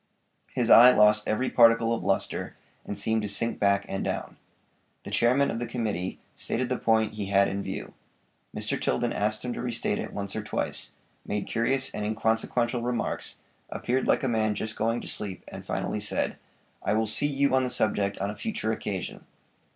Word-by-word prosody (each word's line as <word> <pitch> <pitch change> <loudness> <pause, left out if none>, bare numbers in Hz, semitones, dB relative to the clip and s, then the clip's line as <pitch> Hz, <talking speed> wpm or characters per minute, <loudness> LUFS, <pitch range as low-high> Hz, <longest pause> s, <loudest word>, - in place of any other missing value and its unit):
His 120 -2 +1
eye 120 +2 +10
lost 105 -3 +4
every 125 +4 0
particle 115 -1 +5
of 115 - -3
lustre 95 - -1 0.3
and 100 - -5
seemed 110 0 +1
to 105 - -3
sink 110 +3 -1
back 100 0 +2
and 95 - -3
down. - - -4 0.7
The - - -8
chairman 130 +4 +3
of 115 - -3
the 120 - -3
committee 110 -6 -3
stated 125 +1 -2
the 125 - -1
point 110 -1 +2
he 105 -2 -4
had 100 0 +4
in 100 +1 -3
view. - - -6 0.6
Mr. - - -2
Tilden 65 - 0
asked 105 +2 -1
him 125 - -2
to - - -5
restate 115 -4 -1
it - - -5
once 100 -1 -5
or 110 - -2
twice; 105 -1 -3 0.3
made 105 -1 -3
curious 130 +4 0
and 105 - -3
inconsequential 110 +3 0
remarks, 120 -1 -2 0.3
appeared 130 +2 -1
like - - +2
a - - +1
man 110 -3 +1
just 110 +1 -3
going 115 +2 0
to - - -8
sleep, 100 -3 -3
and - - -9
finally 105 - -2
said: 105 - -1 0.5
"I - - 0
will 110 +1 +2
see 130 +7 +3
you 140 -1 +1
on 130 0 +4
the 125 - -1
subject 100 -4 0
on 100 +1 -2
a - - -8
future 215 - -2
occasion." 100 -4 -4
110 Hz, 190 wpm, -27 LUFS, 105-120 Hz, 0.7 s, eye